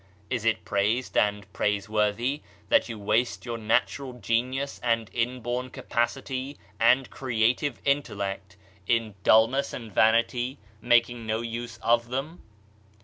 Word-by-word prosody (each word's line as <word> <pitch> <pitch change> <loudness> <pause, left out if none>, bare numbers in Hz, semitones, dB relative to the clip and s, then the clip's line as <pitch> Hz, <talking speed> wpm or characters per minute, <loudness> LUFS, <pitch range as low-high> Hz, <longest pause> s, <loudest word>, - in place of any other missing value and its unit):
Is 120 -4 -1
it 110 -1 +1
praised 105 +5 0
and 105 -1 +2
praiseworthy 105 +7 0 0.3
that - - +4
you 115 - -5
waste 110 +5 0
your 120 -1 -4
natural 125 +4 0
genius 125 +4 -1
and 115 -2 0
inborn 125 +1 -2
capacity 130 +4 -2 0.2
and 125 +3 +4
creative 125 +3 0
intellect 100 -9 -2 0.3
in 115 -3 +1
dullness 115 +7 +4
and 115 -3 -7
vanity, 115 +5 +2 0.2
making 120 -1 +2
no 110 +1 0
use 115 0 -5
of 120 0 +3
them? 140 +7 -4
115 Hz, 120 wpm, -27 LUFS, 110-125 Hz, 0.3 s, that